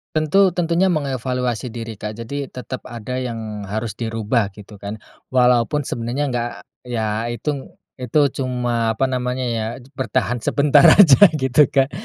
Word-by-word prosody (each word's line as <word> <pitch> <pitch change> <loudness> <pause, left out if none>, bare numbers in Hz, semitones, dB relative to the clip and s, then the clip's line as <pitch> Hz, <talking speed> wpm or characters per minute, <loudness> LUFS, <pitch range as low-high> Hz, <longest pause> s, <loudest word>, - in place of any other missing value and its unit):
Tentu 185 +6 +4
tentunya 175 +2 +2
mengevaluasi 130 -6 -2
diri 115 -2 -7
Kak. 105 0 -5
Jadi 135 +4 -5
tetap 130 0 -7
ada 125 +2 -5
yang 110 -5 -5
harus 110 +1 -3
dirubah 115 -1 -1
gitu 105 -1 -13
kan, 100 +2 -5 0.3
walaupun 125 +2 +2
sebenarnya 120 +5 -3
nggak 120 -1 -1 0.4
ya 110 -1 -2
itung 135 +3 -5 0.2
itu 135 +3 +2
cuma 120 -3 -1
apa 130 +3 0
namanya 125 0 -2
ya, 115 -3 -1 0.3
bertahan 125 -2 -1
sebentar 145 +4 +4
aja 165 -10 +8 0.2
gitu 130 0 +3
kan. 135 +2 +1
125 Hz, 140 wpm, -20 LUFS, 115-135 Hz, 0.4 s, aja